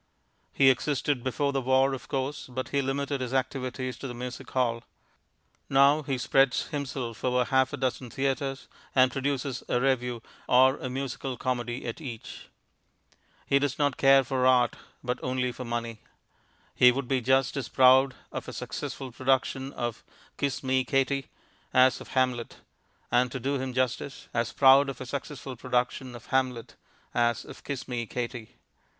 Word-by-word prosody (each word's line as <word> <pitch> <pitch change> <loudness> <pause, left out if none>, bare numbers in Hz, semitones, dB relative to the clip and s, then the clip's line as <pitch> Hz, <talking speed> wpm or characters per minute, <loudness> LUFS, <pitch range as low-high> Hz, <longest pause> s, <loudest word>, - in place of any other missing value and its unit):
He 135 -1 +6
existed 140 0 -1
before 140 +2 0
the 135 - 0
war, 130 +1 +3
of 135 - -7
course, 135 +2 -3
but 130 0 -5
he 140 - +1
limited 140 +1 -2
his 130 +1 -3
activities 130 -1 -2
to 135 - -6
the 120 - -6
music 125 0 -7
hall. 120 -3 0 0.9
Now 140 +3 +5
he 140 -3 -2
spreads 135 +1 +2
himself 130 -6 -4
over 125 0 +2
half 130 0 +2
a 145 - -4
dozen 130 -1 -2
theatres, 135 +1 -2 0.3
and 130 -1 +5
produces 135 -1 -2
a 125 - +2
revue 125 -3 0 0.3
or 130 +2 +5
a 130 - -5
musical 130 0 -4
comedy 120 0 -2
at 115 +5 -5
each. 120 -7 -8 1.0
He 140 - +3
does 140 -1 -1
not 145 -3 +1
care 135 0 +6
for 130 0 +1
Art, 125 -2 +4 0.3
but 125 0 -2
only 125 0 -1
for 125 +1 -7
Money. 115 -1 -4 0.7
He 125 - +7
would 130 0 -3
be 130 -1 +1
just 130 +2 +2
as 135 -4 -3
proud 130 +1 +5 0.2
of - - -6
a - - -6
successful 130 -2 -5
production 130 +2 0
of 120 -4 -4 0.3
Kiss 140 -1 -2
Me, 130 0 +2
Katie, 135 0 0 0.5
as 130 0 +5
of - - -10
Hamlet; 125 -3 0 0.5
and, 125 0 +3
to 135 - -4
do 135 +3 -1
him 130 0 -3
justice, 130 +1 -2
as 115 0 0
proud 135 +1 +6
of 135 - -6
a 130 - -6
successful 135 0 -6
production 125 +1 -2
of 120 - -11
Hamlet, 130 -3 0 0.4
as 120 -1 +1
of - - -12
Kiss 140 -3 -5
Me, 120 -3 -3
Katie. 120 -1 -5
130 Hz, 165 wpm, -28 LUFS, 125-135 Hz, 1.0 s, He